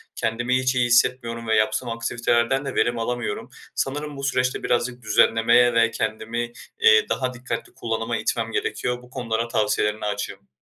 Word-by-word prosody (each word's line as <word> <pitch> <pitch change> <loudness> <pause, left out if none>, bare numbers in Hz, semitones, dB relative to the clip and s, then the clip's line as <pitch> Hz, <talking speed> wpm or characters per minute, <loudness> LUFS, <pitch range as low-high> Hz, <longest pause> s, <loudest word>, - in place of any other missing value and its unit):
Kendimi 120 +2 0
hiç 130 0 0
iyi 125 - +3
hissetmiyorum 120 -1 +2
ve 110 - +2
yaptığım 110 +3 +1
aktivitelerden 120 +3 0
de - - -4
verim 120 0 +1
alamıyorum. 120 -2 -3 0.3
Sanırım 145 +1 -3
bu 140 - -7
süreçte 130 -2 0
birazcık 120 0 0
düzenlemeye 115 +3 +4
ve 115 0 +3
kendimi, 115 +2 -3 0.3
iii, 460 -1 +5
daha 130 -1 -1
dikkatli 120 -1 -5
kullanıma 115 0 -2
itmem 115 0 -2
gerekiyor. 125 +2 -2
Bu 125 - -17
konulara 115 -2 -2
tavsiyelerine 105 -1 0
açığım. 105 -1 -4
120 Hz, 155 wpm, -23 LUFS, 115-125 Hz, 0.3 s, iii